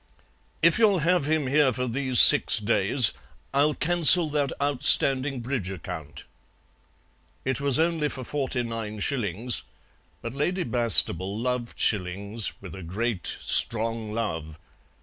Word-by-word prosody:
"If 170 Hz, +5 st, +2 dB
you'll 210 Hz, -4 st, +2 dB
have 175 Hz, -4 st, -1 dB
him 155 Hz, -2 st, -1 dB
here 140 Hz, +1 st, 0 dB
for 125 Hz, +2 st, -5 dB
these 130 Hz, 0 st, -1 dB
six -, -, +8 dB
days 110 Hz, +2 st, +1 dB, 0.4 s
I'll 145 Hz, +2 st, 0 dB
cancel 170 Hz, -1 st, +5 dB
that 145 Hz, -3 st, -3 dB
outstanding 135 Hz, -1 st, +3 dB
bridge 120 Hz, -6 st, -5 dB
account." 80 Hz, -6 st, -10 dB, 1.2 s
It 130 Hz, 0 st, -4 dB
was 140 Hz, -1 st, -1 dB
only 160 Hz, -2 st, -2 dB
for 130 Hz, -, -9 dB
forty 130 Hz, -2 st, -4 dB
nine 115 Hz, -2 st, -8 dB
shillings, 115 Hz, -, -1 dB, 0.6 s
but 115 Hz, -, -7 dB
Lady 175 Hz, +7 st, -3 dB
Bastable 110 Hz, -4 st, +3 dB
loved 125 Hz, 0 st, -5 dB
shillings 100 Hz, +2 st, -2 dB
with 90 Hz, -4 st, -11 dB
a 95 Hz, -, -11 dB
great, 95 Hz, +2 st, -5 dB
strong 115 Hz, -1 st, -3 dB
love. 80 Hz, -9 st, -6 dB
125 Hz, 130 wpm, -23 LUFS, 105-145 Hz, 1.2 s, six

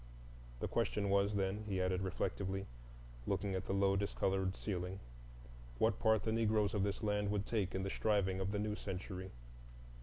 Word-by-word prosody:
The -, -, 0 dB
question 100 Hz, -2 st, 0 dB
was, 100 Hz, +1 st, +3 dB
then, 100 Hz, +2 st, 0 dB
he 95 Hz, -2 st, -1 dB
added 90 Hz, 0 st, +1 dB
reflectively, 95 Hz, +1 st, -2 dB, 0.6 s
looking 100 Hz, 0 st, 0 dB
at 95 Hz, -, -2 dB
the -, -, -1 dB
low 100 Hz, 0 st, +3 dB
discolored 95 Hz, -1 st, 0 dB
ceiling, 95 Hz, -1 st, -3 dB, 0.8 s
what 110 Hz, -, +2 dB
part 110 Hz, -2 st, +4 dB
the 110 Hz, -, 0 dB
Negroes 110 Hz, -2 st, +2 dB
of 105 Hz, -, +1 dB
this 100 Hz, +2 st, -1 dB
land 105 Hz, -1 st, +1 dB
would 100 Hz, -1 st, 0 dB
take 100 Hz, -5 st, -1 dB
in 95 Hz, -, -1 dB
the 95 Hz, -, -1 dB
striving 100 Hz, -3 st, +1 dB
of 95 Hz, +1 st, -1 dB
the 105 Hz, -, -1 dB
new 105 Hz, 0 st, -1 dB
century. 95 Hz, -1 st, -5 dB
100 Hz, 175 wpm, -37 LUFS, 95-105 Hz, 0.8 s, part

